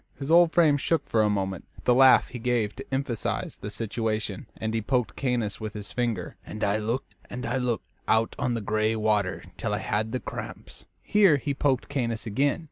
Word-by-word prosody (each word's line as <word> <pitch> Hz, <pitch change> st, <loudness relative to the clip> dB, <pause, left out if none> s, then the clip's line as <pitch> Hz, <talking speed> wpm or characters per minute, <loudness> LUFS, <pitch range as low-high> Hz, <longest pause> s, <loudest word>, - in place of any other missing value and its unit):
His 140 Hz, +3 st, -4 dB
old 170 Hz, 0 st, +7 dB
frame 160 Hz, -5 st, +4 dB
shook 165 Hz, +3 st, 0 dB
for 110 Hz, -, +2 dB
a 105 Hz, -, +3 dB
moment 95 Hz, -3 st, -2 dB
with -, -, -17 dB
the 125 Hz, -, +5 dB
laugh 130 Hz, +1 st, +6 dB
he 125 Hz, -, -7 dB
gave 115 Hz, -3 st, 0 dB
to 135 Hz, -, -8 dB
emphasize 130 Hz, -4 st, -2 dB
the 105 Hz, -, -6 dB
situation, 110 Hz, -2 st, -3 dB
and 110 Hz, 0 st, -3 dB
he 115 Hz, -, 0 dB
poked 125 Hz, +1 st, 0 dB
Caius 120 Hz, -6 st, -1 dB
with 110 Hz, -1 st, -4 dB
his 105 Hz, -2 st, -7 dB
finger. 115 Hz, -8 st, -2 dB
"And 105 Hz, -, -6 dB
I 100 Hz, +1 st, +2 dB
looked 115 Hz, +5 st, -3 dB, 0.2 s
and 125 Hz, 0 st, -5 dB
I 120 Hz, +3 st, 0 dB
looked 125 Hz, -4 st, -1 dB, 0.2 s
out 110 Hz, 0 st, +2 dB
on 120 Hz, -1 st, 0 dB
the 115 Hz, -, -2 dB
gray 110 Hz, +2 st, +1 dB
water 105 Hz, -4 st, 0 dB
till -, -, -1 dB
I -, -, -1 dB
had 110 Hz, +2 st, -1 dB
the 130 Hz, -, -1 dB
cramps." -, -, -8 dB, 0.2 s
Here 200 Hz, -8 st, +5 dB
he 140 Hz, +1 st, -2 dB
poked 135 Hz, -2 st, +1 dB
Caius 115 Hz, -5 st, -2 dB
again. 135 Hz, +9 st, +1 dB
115 Hz, 210 wpm, -27 LUFS, 110-130 Hz, 0.2 s, old